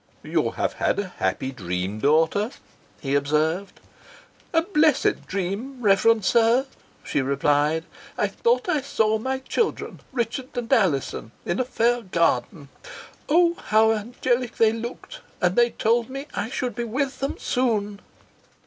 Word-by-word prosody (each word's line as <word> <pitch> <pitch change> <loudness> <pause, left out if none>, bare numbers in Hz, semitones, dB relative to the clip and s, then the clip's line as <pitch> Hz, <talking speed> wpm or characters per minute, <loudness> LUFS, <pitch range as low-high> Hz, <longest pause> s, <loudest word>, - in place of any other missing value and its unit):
"You - - 0
have - - -2
had - - 0
a 195 -3 -4
happy 130 - -1
dream, 95 -2 -4
daughter," 160 - +2 0.5
he 135 -2 -2
observed. 155 +6 0 0.7
"A 325 -1 +3
blessed 320 -5 +2
dream, 200 +8 -3
reverend 215 0 +3
sir," 235 +5 +4 0.4
she 145 - -1
replied. 145 +4 +1 0.3
"I - - +2
thought 475 -2 0
I 310 -5 +1
saw 220 -5 +1
my 265 +4 -2
children, 415 - -2
Richard 250 +1 -3
and 245 +2 -1
Alizon, 150 - 0
in 175 - -1
a - - +3
fair 240 -1 +1
garden 165 - 0 0.6
oh! 340 +2 +4
how 220 +1 +5
angelic 240 +3 -1
they 225 -1 +4
looked 235 - -7 0.2
and 180 0 +1
they 240 0 +4
told 230 +1 +1
me 275 +2 -6
I 205 - -3
should 255 -2 -3
be 240 - -3
with 265 +4 -2
them 275 +1 -2
soon." 210 -5 -1
225 Hz, 140 wpm, -24 LUFS, 170-255 Hz, 0.7 s, how